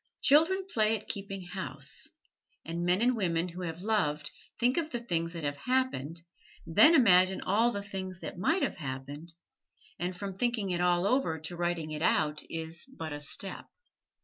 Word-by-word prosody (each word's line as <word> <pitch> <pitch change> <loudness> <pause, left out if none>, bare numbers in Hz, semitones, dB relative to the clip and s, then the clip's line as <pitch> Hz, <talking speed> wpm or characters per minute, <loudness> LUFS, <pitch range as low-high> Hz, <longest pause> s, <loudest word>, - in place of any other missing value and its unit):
Children 325 +7 +5
play 220 - +2
at 215 - -14
keeping 195 -3 -5
house: 185 +2 -3 0.6
and 170 +1 -3
men 180 +5 +2
and 250 +1 +3
women 175 -4 0
who 175 +2 -8
have 170 0 -5
loved 150 -9 0 0.3
think 245 +2 +3
of 325 -2 0
the 240 - -3
things 170 -7 -2
that 165 -2 -6
have 145 0 -2
happened, 170 - -1 0.4
then 305 - +7
imagine 190 - +6
all 220 +5 +3
the 200 -3 -4
things 190 -3 -6
that - - -6
might 325 - +2
have - - -1
happened, 145 +2 -6 0.7
and 180 +1 -2
from 200 0 -4
thinking 220 -2 0
it 175 0 0
all 175 0 +3
over 200 -8 +1
to 170 +2 -5
writing 175 -2 -2
it 155 0 -4
out 150 -2 +2
is 165 +1 -4
but 160 -2 -4
a 145 - -5
step. 170 +6 -2
180 Hz, 175 wpm, -30 LUFS, 165-220 Hz, 0.7 s, then